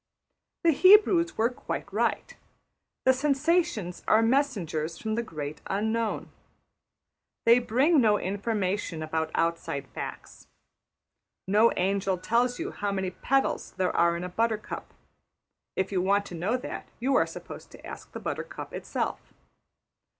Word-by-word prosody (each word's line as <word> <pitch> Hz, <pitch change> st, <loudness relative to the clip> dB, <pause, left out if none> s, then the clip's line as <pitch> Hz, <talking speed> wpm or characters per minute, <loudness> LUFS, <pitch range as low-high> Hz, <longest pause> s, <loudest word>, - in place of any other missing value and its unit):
The 335 Hz, -, +6 dB
Hebrews 370 Hz, +1 st, +5 dB
were 230 Hz, +3 st, +2 dB
quite 200 Hz, -4 st, -6 dB
right. 230 Hz, +2 st, 0 dB, 0.7 s
The 260 Hz, -, +6 dB
sensations 280 Hz, -, 0 dB
are 220 Hz, +1 st, +5 dB
messengers 195 Hz, -, 0 dB
from 220 Hz, -1 st, -3 dB
the 235 Hz, -, 0 dB
Great 155 Hz, -8 st, -6 dB
Unknown. 220 Hz, +3 st, -1 dB, 1.1 s
They 235 Hz, +1 st, +7 dB
bring 265 Hz, +6 st, +3 dB
no 210 Hz, -3 st, +4 dB
information 200 Hz, -4 st, -2 dB
about 160 Hz, 0 st, -1 dB
outside 165 Hz, -4 st, -1 dB
facts. -, -, -8 dB, 1.0 s
No 215 Hz, +4 st, +5 dB
angel 195 Hz, 0 st, +1 dB
tells 235 Hz, +7 st, +1 dB
you -, -, -4 dB
how 205 Hz, 0 st, -2 dB
many 190 Hz, -2 st, -2 dB
petals 270 Hz, +7 st, 0 dB
there 185 Hz, -1 st, 0 dB
are 170 Hz, 0 st, +3 dB
in 175 Hz, -, -5 dB
a 180 Hz, -, -4 dB
buttercup; 220 Hz, +2 st, -2 dB, 0.8 s
if 190 Hz, +1 st, -1 dB
you 185 Hz, -2 st, +1 dB
want 200 Hz, +2 st, +2 dB
to 190 Hz, -, -9 dB
know 185 Hz, +9 st, 0 dB
that, 250 Hz, -, -7 dB
you 265 Hz, +3 st, +1 dB
are -, -, +4 dB
supposed -, -, -9 dB
to -, -, -14 dB
ask -, -, -9 dB
the -, -, -6 dB
buttercup -, -, -5 dB
itself. -, -, -4 dB
210 Hz, 135 wpm, -28 LUFS, 180-245 Hz, 1.1 s, They